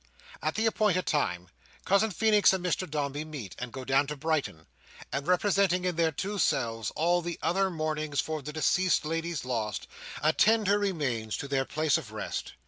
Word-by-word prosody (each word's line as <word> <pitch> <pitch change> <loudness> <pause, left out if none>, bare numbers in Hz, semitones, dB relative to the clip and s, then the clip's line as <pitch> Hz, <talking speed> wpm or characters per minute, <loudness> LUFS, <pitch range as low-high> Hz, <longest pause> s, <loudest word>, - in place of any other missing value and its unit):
At 155 - -1
the 220 - +1
appointed 210 -5 +2
time, 90 - 0 0.4
Cousin 200 +3 +3
Feenix 210 0 +4
and 185 -1 -2
Mr 180 0 -1
Dombey 145 0 -2
meet, 145 - -8
and 125 -1 -5
go 130 +1 -7
down 135 +2 +3
to 150 - -4
Brighton, 140 - -2 0.5
and 140 +1 -2
representing, 185 0 +2
in 180 -2 0
their 165 -1 +2
two 200 +7 -3
selves, 115 - 0
all 175 +2 +2
the 170 0 -4
other 190 +4 +2
mourners 155 -3 -2
for 155 -1 -2
the 145 +2 -6
deceased 170 +3 +2
lady's 165 -1 -2
loss, 110 -4 -2 0.4
attend 215 +8 +4
her 205 +1 +3
remains 135 - -1
to 140 - -5
their 135 -1 0
place 155 +1 +1
of 115 - -11
rest. 110 -1 -5
155 Hz, 180 wpm, -29 LUFS, 140-185 Hz, 0.5 s, Feenix